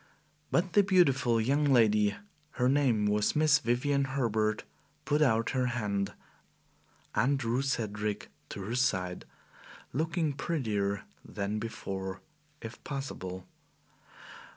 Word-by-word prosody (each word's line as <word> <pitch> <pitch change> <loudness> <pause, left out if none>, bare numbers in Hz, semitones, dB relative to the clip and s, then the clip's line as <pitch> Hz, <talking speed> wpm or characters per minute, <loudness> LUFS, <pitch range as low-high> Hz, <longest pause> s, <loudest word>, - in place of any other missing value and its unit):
But 180 0 +1
the 205 - +7
beautiful 140 - +3
young 140 +7 +2
lady 105 -7 +4 0.4
her 125 - +1
name 130 -6 +3
was 105 0 +1
Miss 150 -1 +5
Vivian 140 +2 +1
Herbert 110 -5 0 0.4
put 150 +2 +1
out 115 -5 +3
her 130 -1 +1
hand 105 -5 -1 1.0
and 135 +6 +2
drew 125 0 0
Cedric 105 -6 -2 0.2
to 100 - -6
her 110 +5 -4
side, 95 -8 0 0.7
looking 160 +2 0
prettier 105 -10 -1 0.2
than 105 +1 -3
before, 95 -4 -5 0.4
if 115 0 -9
possible. 95 -10 -5
120 Hz, 110 wpm, -30 LUFS, 105-140 Hz, 1.0 s, the